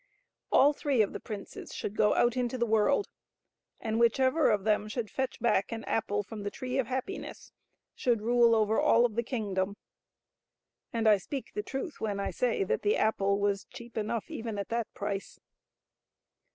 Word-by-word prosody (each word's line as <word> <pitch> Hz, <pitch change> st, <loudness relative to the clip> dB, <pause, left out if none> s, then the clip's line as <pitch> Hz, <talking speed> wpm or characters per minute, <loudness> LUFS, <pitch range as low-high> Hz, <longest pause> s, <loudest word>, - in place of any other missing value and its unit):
All 285 Hz, +2 st, +6 dB
three 275 Hz, -6 st, +2 dB
of 200 Hz, -, -4 dB
the -, -, -5 dB
princes 205 Hz, -3 st, -8 dB
should 205 Hz, -, -4 dB
go 210 Hz, -1 st, +3 dB
out 240 Hz, 0 st, +3 dB
into 250 Hz, 0 st, -1 dB
the 235 Hz, -, +1 dB
world, 225 Hz, -, +2 dB, 0.7 s
and 220 Hz, 0 st, -1 dB
whichever 260 Hz, +6 st, +4 dB
of 210 Hz, -3 st, +2 dB
them 210 Hz, 0 st, +1 dB
should 220 Hz, 0 st, -4 dB
fetch 265 Hz, -1 st, -2 dB
back 220 Hz, -3 st, +1 dB
an 225 Hz, -1 st, -4 dB
apple 205 Hz, -2 st, -1 dB
from 210 Hz, +2 st, -8 dB
the 205 Hz, -, -2 dB
Tree 255 Hz, +4 st, -3 dB
of 250 Hz, -, 0 dB
Happiness 260 Hz, +10 st, -5 dB, 0.4 s
should 240 Hz, -3 st, +1 dB
rule 235 Hz, 0 st, +5 dB
over 220 Hz, 0 st, +2 dB
all 235 Hz, +1 st, +5 dB
of 235 Hz, -, -1 dB
the 235 Hz, -, 0 dB
kingdom. 205 Hz, -5 st, -2 dB, 1.1 s
And 230 Hz, -2 st, 0 dB
I 210 Hz, -1 st, +7 dB
speak 265 Hz, +8 st, -6 dB
the 210 Hz, -, -2 dB
truth 270 Hz, -, -5 dB
when 205 Hz, -2 st, -1 dB
I 200 Hz, -, -2 dB
say 245 Hz, -5 st, 0 dB
that 190 Hz, -, -1 dB
the 210 Hz, -, +2 dB
apple 200 Hz, -2 st, +2 dB
was 200 Hz, -1 st, 0 dB
cheap 235 Hz, 0 st, -12 dB
enough 220 Hz, 0 st, -2 dB
even 225 Hz, -2 st, -4 dB
at 200 Hz, -, -4 dB
that 230 Hz, -1 st, -2 dB
price. 200 Hz, -1 st, -4 dB
225 Hz, 180 wpm, -30 LUFS, 205-245 Hz, 1.1 s, I